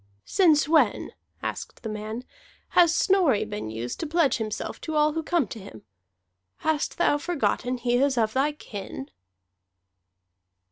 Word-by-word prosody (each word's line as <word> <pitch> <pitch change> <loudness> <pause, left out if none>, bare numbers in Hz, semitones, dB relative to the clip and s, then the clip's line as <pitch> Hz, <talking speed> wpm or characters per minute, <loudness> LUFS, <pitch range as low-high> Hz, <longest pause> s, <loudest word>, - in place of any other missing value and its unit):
"Since 320 -7 +4
when," 315 0 +3 0.3
asked - - -5
the - - -3
man, 215 +3 -5 0.5
"has 345 -1 +5
Snorri 360 - +3
been 210 - -5
used 115 +2 -5
to 325 - -3
pledge 315 -2 +2
himself 220 -2 -4
to 315 - -4
all 300 0 +3
who 325 - -1
come 330 -2 +1
to 225 - -7
him? 150 - -12 0.8
Hast 310 -2 0
thou 320 -4 +3
forgotten 280 -6 -1
he 240 0 +1
is 270 0 +2
of 220 -2 +1
thy 280 +3 +1
kin?" 195 - -8
280 Hz, 145 wpm, -26 LUFS, 220-315 Hz, 0.8 s, has